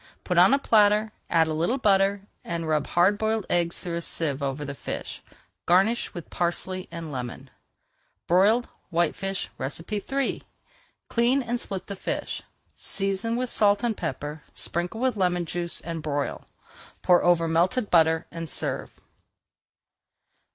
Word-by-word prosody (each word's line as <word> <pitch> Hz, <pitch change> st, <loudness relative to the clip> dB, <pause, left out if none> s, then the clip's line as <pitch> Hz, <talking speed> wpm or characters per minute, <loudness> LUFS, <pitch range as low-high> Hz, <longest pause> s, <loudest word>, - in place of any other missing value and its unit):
Put 180 Hz, -2 st, +2 dB
on 180 Hz, +5 st, +7 dB
a 275 Hz, -, +5 dB
platter, 215 Hz, -4 st, +4 dB, 0.2 s
add 165 Hz, -1 st, +4 dB
a 160 Hz, -, -1 dB
little 170 Hz, -, +1 dB
butter, 200 Hz, -4 st, +3 dB, 0.2 s
and 170 Hz, -1 st, -3 dB
rub 155 Hz, -2 st, +1 dB
hard 190 Hz, +4 st, +3 dB
boiled 220 Hz, -1 st, 0 dB
eggs 170 Hz, -1 st, +1 dB
through 170 Hz, -1 st, -4 dB
a -, -, -3 dB
sieve 150 Hz, -4 st, -2 dB
over 140 Hz, +1 st, -2 dB
the 140 Hz, -, -4 dB
fish. -, -, -5 dB, 0.5 s
Garnish 195 Hz, +7 st, +3 dB
with 175 Hz, -, -9 dB
parsley 185 Hz, +2 st, -1 dB
and 165 Hz, -2 st, -7 dB
lemon. 130 Hz, 0 st, -6 dB, 0.7 s
BROILED 205 Hz, +7 st, +4 dB, 0.2 s
WHITEFISH 180 Hz, +3 st, -1 dB, 0.4 s
III 270 Hz, +6 st, -1 dB, 0.7 s
Clean 245 Hz, +3 st, +2 dB
and 240 Hz, 0 st, -2 dB
split 190 Hz, -4 st, -5 dB
the 200 Hz, -, -6 dB
fish, -, -, -3 dB, 0.3 s
season 195 Hz, +3 st, -1 dB
with 250 Hz, 0 st, -2 dB
salt 205 Hz, 0 st, +3 dB
and 235 Hz, -2 st, +1 dB
pepper, 150 Hz, -2 st, -4 dB
sprinkle 175 Hz, +6 st, -2 dB
with 255 Hz, -1 st, +1 dB
lemon 180 Hz, -2 st, +1 dB
juice, 170 Hz, +1 st, -2 dB
and 165 Hz, -1 st, -5 dB
broil. 145 Hz, -2 st, -3 dB, 0.6 s
Pour 180 Hz, -1 st, +5 dB
over 170 Hz, -1 st, +4 dB
melted 185 Hz, +8 st, +1 dB
butter 160 Hz, -1 st, +4 dB
and 165 Hz, -1 st, -5 dB
serve. -, -, -4 dB
180 Hz, 145 wpm, -26 LUFS, 165-210 Hz, 0.7 s, on